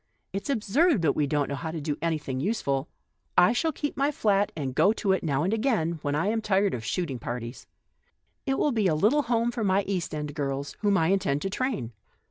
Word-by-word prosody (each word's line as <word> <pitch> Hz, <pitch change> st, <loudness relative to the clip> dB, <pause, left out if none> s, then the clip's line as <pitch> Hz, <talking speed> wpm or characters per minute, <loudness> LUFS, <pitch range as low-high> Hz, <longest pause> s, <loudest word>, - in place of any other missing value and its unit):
It's 195 Hz, +7 st, -4 dB
absurd 260 Hz, -, +2 dB
that 145 Hz, -, +2 dB
we 150 Hz, -, +1 dB
do 150 Hz, -, -1 dB
not 145 Hz, -1 st, +1 dB
know -, -, -2 dB
how 160 Hz, +3 st, -4 dB
to 160 Hz, 0 st, -4 dB
do 145 Hz, 0 st, -2 dB
any 165 Hz, -1 st, +1 dB
thing 130 Hz, -3 st, -4 dB
useful, 140 Hz, -, -1 dB, 0.5 s
I 180 Hz, -, +6 dB
shall 320 Hz, +6 st, +1 dB
keep 290 Hz, 0 st, -4 dB
my 275 Hz, +1 st, +2 dB
flat, 205 Hz, -6 st, +1 dB
and 135 Hz, -4 st, -3 dB
go 200 Hz, +10 st, +4 dB
to 205 Hz, -3 st, 0 dB
it 190 Hz, -, +1 dB
now 145 Hz, -3 st, 0 dB
and 190 Hz, +5 st, 0 dB
again, 215 Hz, -, 0 dB
when 145 Hz, -1 st, -1 dB
I 155 Hz, -, +1 dB
am 225 Hz, +1 st, 0 dB
tired 200 Hz, -1 st, +2 dB
of 115 Hz, -, -4 dB
shoot 170 Hz, +6 st, -2 dB
ing 125 Hz, -, -5 dB
parties. 120 Hz, +1 st, -6 dB, 0.8 s
It 270 Hz, -, +1 dB
will 295 Hz, -, +2 dB
be 220 Hz, -5 st, +2 dB
a 160 Hz, -, +2 dB
little 220 Hz, -, +3 dB
home 235 Hz, -2 st, +1 dB
for 235 Hz, -2 st, -3 dB
my 195 Hz, 0 st, +2 dB
East 185 Hz, -6 st, -3 dB
End 150 Hz, -1 st, -4 dB
girls, 140 Hz, -1 st, -3 dB
whom 205 Hz, -2 st, +2 dB
I 165 Hz, -2 st, +2 dB
intend 150 Hz, -7 st, +1 dB
to 195 Hz, -, -2 dB
train. 220 Hz, -, -2 dB
190 Hz, 240 wpm, -27 LUFS, 145-220 Hz, 0.8 s, I